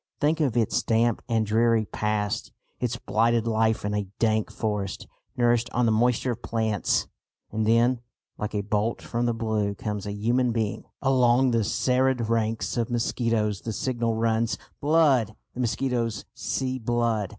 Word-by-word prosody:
Think 155 Hz, +2 st, +2 dB
of 135 Hz, -6 st, +1 dB
its 115 Hz, -3 st, +2 dB
damp 115 Hz, 0 st, +1 dB
and 110 Hz, -1 st, +2 dB
dreary 115 Hz, +1 st, +3 dB
past, 105 Hz, -1 st, -2 dB, 0.3 s
its -, -, -1 dB
blighted 115 Hz, +1 st, +1 dB
life 110 Hz, -1 st, +1 dB
in 105 Hz, -, -1 dB
a 105 Hz, -1 st, -1 dB
dank 110 Hz, -2 st, +1 dB
forest, 105 Hz, -3 st, -3 dB, 0.3 s
nourished 120 Hz, -1 st, +2 dB
on 125 Hz, 0 st, +2 dB
the 115 Hz, -, +3 dB
moisture 120 Hz, +3 st, +2 dB
of 120 Hz, 0 st, -5 dB
plants! 110 Hz, -4 st, 0 dB, 0.5 s
And 110 Hz, 0 st, -1 dB
then, 120 Hz, +2 st, +3 dB, 0.4 s
like 105 Hz, 0 st, -4 dB
a 105 Hz, -, +1 dB
bolt 105 Hz, +2 st, -1 dB
from 120 Hz, +1 st, -1 dB
the 120 Hz, -, +1 dB
blue, 110 Hz, -3 st, -1 dB
comes 105 Hz, 0 st, -4 dB
a -, -, -3 dB
human 120 Hz, +4 st, +1 dB
being! 110 Hz, -3 st, -2 dB, 0.2 s
Along 130 Hz, -1 st, +4 dB
the 115 Hz, -1 st, +2 dB
serried 125 Hz, 0 st, +1 dB
ranks 115 Hz, +1 st, 0 dB
of 120 Hz, 0 st, 0 dB
mosquitoes 115 Hz, -3 st, 0 dB
the 115 Hz, -, -4 dB
signal 115 Hz, 0 st, -1 dB
runs, 115 Hz, 0 st, +1 dB, 0.2 s
"Blood!" 140 Hz, -8 st, +3 dB, 0.2 s
The -, -, -9 dB
mosquitoes 120 Hz, -1 st, -1 dB
"see 130 Hz, -1 st, -2 dB
blood." 115 Hz, -3 st, 0 dB
115 Hz, 160 wpm, -26 LUFS, 110-120 Hz, 0.5 s, Along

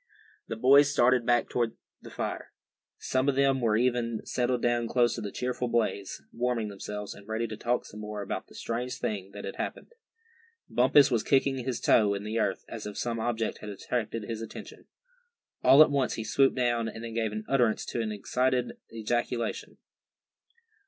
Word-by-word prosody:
The -, -, -4 dB
boys 140 Hz, +5 st, +6 dB
started 125 Hz, -3 st, +3 dB
back 120 Hz, 0 st, +3 dB
to 120 Hz, -2 st, -1 dB, 0.3 s
the -, -, -11 dB
fire. -, -, -5 dB, 0.5 s
Some 130 Hz, +2 st, 0 dB
of 135 Hz, -, +1 dB
them 135 Hz, -1 st, +3 dB
were 110 Hz, -2 st, +2 dB
even 120 Hz, -2 st, 0 dB
settled 125 Hz, -1 st, 0 dB
down 120 Hz, -1 st, +1 dB
close 120 Hz, 0 st, +2 dB
to -, -, -5 dB
the 100 Hz, -, -5 dB
cheerful 125 Hz, 0 st, -2 dB
blaze, 115 Hz, -4 st, -1 dB
warming 120 Hz, -3 st, -1 dB
themselves, 105 Hz, +1 st, -6 dB
and 100 Hz, 0 st, -15 dB
ready 110 Hz, +1 st, -1 dB
to 110 Hz, -1 st, -5 dB
talk 120 Hz, +3 st, -1 dB
some 105 Hz, -, -10 dB
more 105 Hz, -1 st, -5 dB
about 100 Hz, -, -4 dB
the -, -, -17 dB
strange 125 Hz, +2 st, -3 dB
thing 100 Hz, -3 st, -3 dB
that -, -, -7 dB
had -, -, -6 dB
happened. -, -, -5 dB, 0.7 s
Bumpus 135 Hz, +3 st, +5 dB
was 115 Hz, -3 st, +2 dB
kicking 135 Hz, +1 st, +2 dB
his 125 Hz, -1 st, -3 dB
toe 105 Hz, -3 st, +4 dB
into 100 Hz, +1 st, -5 dB
the 110 Hz, +2 st, -1 dB
earth, 100 Hz, -3 st, -1 dB
as 110 Hz, -2 st, -7 dB
if 105 Hz, -, -7 dB
some 115 Hz, -1 st, -2 dB
object 115 Hz, -1 st, -2 dB
had 105 Hz, -, -8 dB
attracted 110 Hz, +2 st, -3 dB
his 110 Hz, +1 st, -5 dB
attention. 115 Hz, -, -9 dB, 0.8 s
All 145 Hz, +3 st, +9 dB
at 155 Hz, -, 0 dB
once 140 Hz, -3 st, +1 dB
he 110 Hz, -, -4 dB
swooped 135 Hz, +5 st, +3 dB
down, 120 Hz, -2 st, +1 dB
and 115 Hz, +1 st, -7 dB
then 115 Hz, -1 st, -6 dB
gave 110 Hz, -2 st, -1 dB, 0.2 s
utterance 120 Hz, -5 st, +2 dB
to 120 Hz, -, -3 dB
an 110 Hz, -1 st, -2 dB
excited 125 Hz, +4 st, 0 dB, 0.2 s
ejaculation. 120 Hz, +1 st, -2 dB
120 Hz, 185 wpm, -28 LUFS, 110-125 Hz, 0.8 s, All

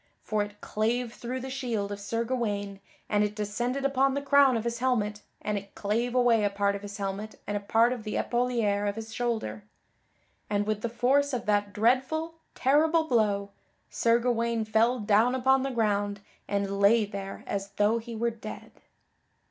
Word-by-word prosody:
For 215 Hz, -1 st, 0 dB
it 205 Hz, 0 st, -6 dB
clave 230 Hz, +2 st, -1 dB
through 250 Hz, +2 st, -5 dB
the 265 Hz, +1 st, -6 dB
shield 235 Hz, -7 st, -2 dB
of 205 Hz, -, -5 dB
Sir 230 Hz, +3 st, -2 dB
Gawaine 205 Hz, -5 st, -2 dB, 0.3 s
and 205 Hz, 0 st, +2 dB
it 210 Hz, 0 st, -2 dB
descended 240 Hz, +6 st, -2 dB
upon 270 Hz, 0 st, +2 dB
the 280 Hz, -, -1 dB
crown 280 Hz, -3 st, +5 dB
of 220 Hz, -, -3 dB
his 235 Hz, 0 st, -2 dB
helmet 215 Hz, -5 st, 0 dB, 0.2 s
and 210 Hz, -1 st, -1 dB
it 200 Hz, 0 st, -17 dB
clave 230 Hz, +4 st, -1 dB
away 240 Hz, -3 st, +4 dB
a 205 Hz, -, +3 dB
part 200 Hz, 0 st, +1 dB
of 200 Hz, -, -6 dB
his 205 Hz, 0 st, -7 dB
helmet 200 Hz, +2 st, -4 dB
and 205 Hz, -, -3 dB
a -, -, 0 dB
part 225 Hz, +4 st, +3 dB
of 240 Hz, -3 st, -7 dB
the 215 Hz, -1 st, -4 dB
epauliere 230 Hz, -5 st, 0 dB
of 200 Hz, -, -4 dB
his 225 Hz, 0 st, -7 dB
shoulder; 220 Hz, -, -2 dB, 0.9 s
and 205 Hz, 0 st, +1 dB
with 215 Hz, 0 st, -1 dB
the 235 Hz, -, -2 dB
force 265 Hz, +4 st, +2 dB
of 245 Hz, -, -2 dB
that 205 Hz, -1 st, +1 dB
dreadful, 260 Hz, -, +1 dB, 0.2 s
terrible 310 Hz, +5 st, +3 dB
blow, 210 Hz, -7 st, +1 dB, 0.4 s
Sir 230 Hz, 0 st, +3 dB
Gawaine 235 Hz, -2 st, 0 dB
fell 225 Hz, +3 st, +3 dB
down 220 Hz, +3 st, +3 dB
upon 265 Hz, +1 st, +3 dB
the 270 Hz, -, -1 dB
ground 205 Hz, -4 st, 0 dB, 0.3 s
and 200 Hz, -1 st, -1 dB
lay 210 Hz, +2 st, +5 dB
there 195 Hz, -1 st, -7 dB
as 200 Hz, 0 st, -3 dB
though 210 Hz, +3 st, +2 dB
he 230 Hz, 0 st, -8 dB
were 235 Hz, +1 st, 0 dB
dead. 220 Hz, -1 st, -9 dB
225 Hz, 185 wpm, -28 LUFS, 205-245 Hz, 0.9 s, crown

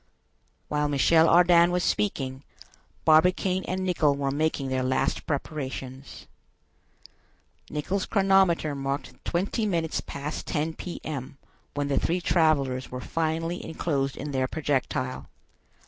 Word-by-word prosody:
While 150 Hz, 0 st, 0 dB
Michel 160 Hz, +3 st, +4 dB
Ardan 175 Hz, 0 st, +6 dB
was 180 Hz, 0 st, 0 dB
speaking, 135 Hz, -9 st, -1 dB, 0.6 s
Barbicane 180 Hz, +4 st, +4 dB
and 185 Hz, +1 st, -2 dB
Nicholl 160 Hz, -6 st, +2 dB
were 140 Hz, -1 st, -1 dB
making 145 Hz, -2 st, -1 dB
their 130 Hz, 0 st, 0 dB
last 130 Hz, 0 st, 0 dB
preparations. 135 Hz, -3 st, -5 dB, 1.4 s
Nicholl's 180 Hz, +6 st, -2 dB
chronometer 190 Hz, -6 st, +3 dB
marked 140 Hz, 0 st, -4 dB
twenty 200 Hz, +5 st, -1 dB
minutes 165 Hz, -4 st, -1 dB
past 140 Hz, +2 st, -6 dB
ten 155 Hz, +2 st, -1 dB
P.M. 145 Hz, -6 st, -6 dB, 0.4 s
when 145 Hz, -1 st, -1 dB
the 140 Hz, -, +1 dB
three 175 Hz, +2 st, 0 dB
travelers 145 Hz, -7 st, +1 dB
were 125 Hz, -, -5 dB
finally 165 Hz, +4 st, -2 dB
enclosed 140 Hz, -4 st, -2 dB
in 145 Hz, +2 st, -5 dB
their 130 Hz, -1 st, 0 dB
projectile. 130 Hz, -3 st, -2 dB
155 Hz, 115 wpm, -26 LUFS, 135-170 Hz, 1.4 s, Ardan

